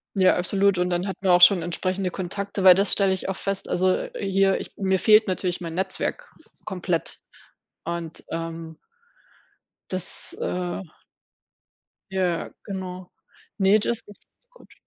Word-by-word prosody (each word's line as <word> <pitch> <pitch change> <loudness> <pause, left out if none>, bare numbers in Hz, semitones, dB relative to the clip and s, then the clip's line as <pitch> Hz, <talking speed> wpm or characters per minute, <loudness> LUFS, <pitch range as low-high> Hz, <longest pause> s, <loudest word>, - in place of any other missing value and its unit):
Ja, 185 -1 +4
absolut 195 +1 +1
und 180 0 +1
dann 175 +2 -1
hat 190 - -4
man 190 -2 +2
auch 175 0 +5
schon 180 -1 +8
entsprechende 185 +2 -2
Kontakte, 195 +2 -4
weil 185 -1 +10
das 195 0 +2
stelle 195 -2 +3
ich 190 - -4
oft 190 - -4
fest, 195 0 -3
also, 185 +1 +2
äh, - - -5
hier 195 0 +2
ich - - -8
mir 190 -1 +1
fehlt 215 -1 +5
natürlich 180 -1 -2
mein 165 -1 -5
Netzwerk 190 - -3 0.3
komplett 180 -4 -2 0.7
und, 170 -1 -5
ähm 165 -1 -5 1.1
das, 185 -2 -3
äh 180 +1 -3 1.3
Ja 180 -3 -1
genau. 185 -2 -7 0.5
Ne, 195 +3 +5
das 230 +2 -2
ist 205 - -14 0.2
gut. - - -19
185 Hz, 145 wpm, -24 LUFS, 175-195 Hz, 1.3 s, weil